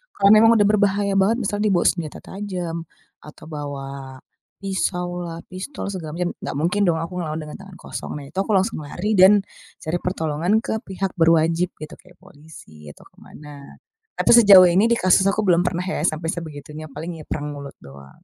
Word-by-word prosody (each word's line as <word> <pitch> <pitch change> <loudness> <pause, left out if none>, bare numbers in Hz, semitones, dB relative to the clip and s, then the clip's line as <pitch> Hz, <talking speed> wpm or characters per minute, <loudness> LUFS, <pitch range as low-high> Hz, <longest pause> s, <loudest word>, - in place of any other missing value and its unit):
kalau 200 0 +4
memang 225 +2 +7
udah 205 - +4
berbahaya 200 -1 +2
banget 205 +4 +3
misal 205 0 -2
dia 215 - +1
bawa 175 - +2
senjata 160 -4 -1
tajam, 180 -5 -6 0.3
atau 150 - -15
bawa, 140 -3 -8 0.4
pisaulah, 175 -3 -3
pistol 200 +2 -6
segala 160 -5 -6
macem 175 0 -2
gak - - -5
mungkin 170 +7 0
dong 165 - +2
aku 170 +3 -5
ngelawan 155 -2 -4
dengan 150 0 -9
tangan 195 -1 -13
kosong - - -8
nah 145 - -7
itu 140 +7 -14
aku 195 +2 -1
langsung 195 +2 0
lari 175 +8 -4
dan, 195 +2 +7 0.4
cari 170 +2 -2
pertolongan 175 +5 -1
ke 220 - -2
pihak 190 0 -3
berwajib 165 +2 +2
gitu 155 - -10
kayak 180 -1 -20
polisi 145 - -15
atau 75 - -13
ke - - -24
mana, 145 -2 -13 0.4
tapi - - +2
sejauh 205 -6 +9
ini 185 +5 +4
di 235 - +2
kasus 190 -1 +3
aku 210 +2 +1
belum 175 -4 +3
pernah 180 0 -2
ya 185 - -3
sampe 160 +1 -2
sebegitunya 155 -1 -8
paling 160 +4 -7
ya 155 - -11
perang 150 -1 -4
mulut 140 -1 -9
doang. 70 0 -15
175 Hz, 190 wpm, -21 LUFS, 150-195 Hz, 0.4 s, sejauh